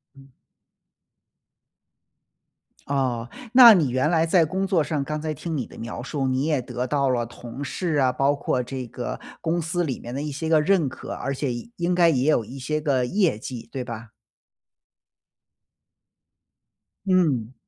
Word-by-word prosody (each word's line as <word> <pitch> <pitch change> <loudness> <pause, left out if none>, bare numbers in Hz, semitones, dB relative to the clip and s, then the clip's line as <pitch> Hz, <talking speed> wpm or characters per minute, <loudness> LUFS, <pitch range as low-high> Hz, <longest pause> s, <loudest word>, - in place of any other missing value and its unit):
嗯。 135 0 -17 2.6
哦， 125 -4 -1 0.2
那 245 -3 +11
你 165 -9 +2
原 130 +5 +1
来 165 -1 +3
在 165 0 +4
工 190 +5 -2
作 185 -5 +2
上， 150 -3 -2
刚 150 +1 -4
才 155 -1 -2
听 160 +3 -5
你 130 -6 -2
的 - - -14
描 115 +1 -6
述， 135 +1 -2
你 130 +2 0
也 150 -4 +1
得 125 0 -4
到 140 -2 +1
了 120 -2 +1
同 120 +3 -9
事 160 +4 -2
啊， 130 -3 +3
包 135 +3 +2
括 130 -3 -1
这 130 0 -6
个 120 +1 -5 0.2
公 170 +1 0
司 175 +2 -1
里 135 -6 -3
面 120 - -8
的 140 - -2
一 150 -1 -4
些 160 +3 -4
个 160 -1 +5
认 175 -3 +2
可， - - -9
而 140 - -3
且 135 -2 -2
也 120 - -7
应 175 +1 0
该 175 -1 +5
也 135 -1 +2
有 125 -7 +3
一 125 +6 -9
些 150 +4 -2
个 135 -4 +1
业 180 - +1
绩， 120 0 -7
对 130 - -4
吧？ 115 -2 -8 3.0
嗯。 150 - +2
140 Hz, 185 characters per minute, -24 LUFS, 125-160 Hz, 3.0 s, 那